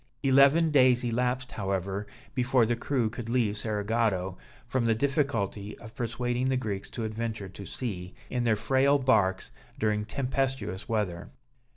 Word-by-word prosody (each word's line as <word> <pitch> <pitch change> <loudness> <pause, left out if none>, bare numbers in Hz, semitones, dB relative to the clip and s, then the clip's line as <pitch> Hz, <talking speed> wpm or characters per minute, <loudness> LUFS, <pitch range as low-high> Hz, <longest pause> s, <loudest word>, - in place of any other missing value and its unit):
Eleven 140 +4 +5
days 130 -3 +5
elapsed, 125 +2 -1
however, 95 0 -2 0.3
before 125 -2 +3
the 120 +2 +1
crew 120 -1 0
could 115 +1 -6
leave 115 -4 +1
Cerigotto, 105 -3 0 0.3
from 125 0 0
the 115 - +3
difficulty 115 -7 -1
of 110 -1 -12
persuading 120 +2 -1
the 130 - +2
Greeks 105 -5 -3
to 115 - -5
adventure 110 -2 -3
to 100 +1 -9
sea, 95 -7 -5
in 125 -1 -1
their 115 -2 +3
frail 135 +6 +3
barks, 110 -8 +2 0.3
during 105 -1 0
tempestuous 125 -4 -2
weather. 100 -6 -1
115 Hz, 145 wpm, -28 LUFS, 105-130 Hz, 0.3 s, Eleven